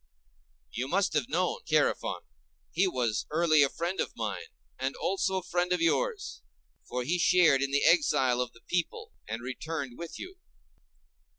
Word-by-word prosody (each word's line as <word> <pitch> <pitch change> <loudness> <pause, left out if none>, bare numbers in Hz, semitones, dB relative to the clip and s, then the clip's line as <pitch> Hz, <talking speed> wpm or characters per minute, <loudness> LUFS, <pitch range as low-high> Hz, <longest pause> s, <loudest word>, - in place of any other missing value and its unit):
You 125 +2 -3
must 185 +4 +1
have 150 -5 0
known 180 +3 0
Chærephon; 155 -2 +1 0.5
he 185 +4 +2
was 120 -10 -1
early 155 -1 +4
a 140 - +5
friend 175 +6 -3
of - - -2
mine, 100 -7 -4 0.3
and 130 +1 -2
also 190 0 0
a 185 - -3
friend 180 0 -1
of 180 - +2
yours, 410 - 0 0.5
for 125 0 -2
he 175 +8 0
shared 170 -6 +5
in 140 - 0
the 140 +1 +1
exile 145 -7 +4
of 125 - -3
the 115 - -19
people, 175 +4 -3 0.2
and 115 +2 -5
returned 130 0 -5
with 170 -1 -7
you. 370 +1 -9
155 Hz, 165 wpm, -29 LUFS, 130-180 Hz, 0.5 s, a